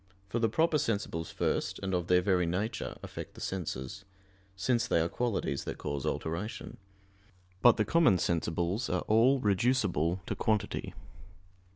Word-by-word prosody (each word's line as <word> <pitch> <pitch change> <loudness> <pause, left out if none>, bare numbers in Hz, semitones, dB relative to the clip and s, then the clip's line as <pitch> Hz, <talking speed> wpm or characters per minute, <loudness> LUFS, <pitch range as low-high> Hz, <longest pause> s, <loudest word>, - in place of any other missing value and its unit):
For 120 - -1
the 115 -1 +2
proper 160 +6 +2
sensibles 100 - -2
first, - - -1
and 95 0 -2
of 90 -1 0
their 90 0 +4
very 90 -3 +2
nature, 100 +6 -2
affect - - -8
the - - -11
senses; 90 -1 -4 0.5
since 120 +5 +1
they - - +3
are 80 - +2
qualities 105 - -1
that - - -4
cause 70 -2 -3
alteration. 85 +7 -4 0.8
But 120 -2 +7
the 105 - +2
common 165 - +4
sensibles 85 +5 -1
are - - +1
all 120 +5 +4
reducible 100 - +1
to - - -3
quantity. 110 -2 -1
95 Hz, 150 wpm, -31 LUFS, 85-115 Hz, 0.8 s, But